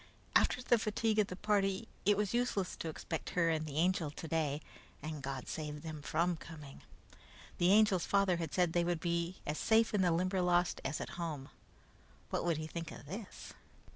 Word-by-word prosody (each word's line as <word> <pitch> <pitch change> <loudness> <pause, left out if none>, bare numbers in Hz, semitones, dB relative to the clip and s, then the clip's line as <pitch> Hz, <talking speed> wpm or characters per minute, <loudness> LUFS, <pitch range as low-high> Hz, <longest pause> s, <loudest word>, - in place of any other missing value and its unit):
After 250 - +4
the 240 -2 +4
fatigue 215 0 +1
of 210 - +4
the 180 - -5
party, 200 +1 +1 0.2
it 205 -1 +5
was 210 0 0
useless 235 -6 0
to 165 - -4
expect 160 +1 -4
her 165 -2 +4
and 155 -1 -1
the 145 - -6
Angel 170 -1 +2
today, 155 -1 -1 0.4
and 155 0 -5
God 135 -1 -4
save 150 -1 -5
them 155 -2 -6
from 170 +4 +1
coming! 150 -4 -10 0.8
The 175 +2 +5
Angel's 205 -4 +5
father 195 -3 +3
had 165 -3 -3
said 180 -3 +2
they 175 - +3
would 175 -1 0
be 170 +1 -1
as 150 - -2
safe 225 0 +4
in 205 - +3
the 180 - +4
Limberlost 180 0 +2
as - - -2
at 175 - -6
home. 150 -5 -4 0.8
What - - 0
would 170 -3 +1
he 155 - -3
think 165 +1 -5
of - - -10
this? 195 +7 -8
175 Hz, 190 wpm, -34 LUFS, 155-195 Hz, 0.8 s, it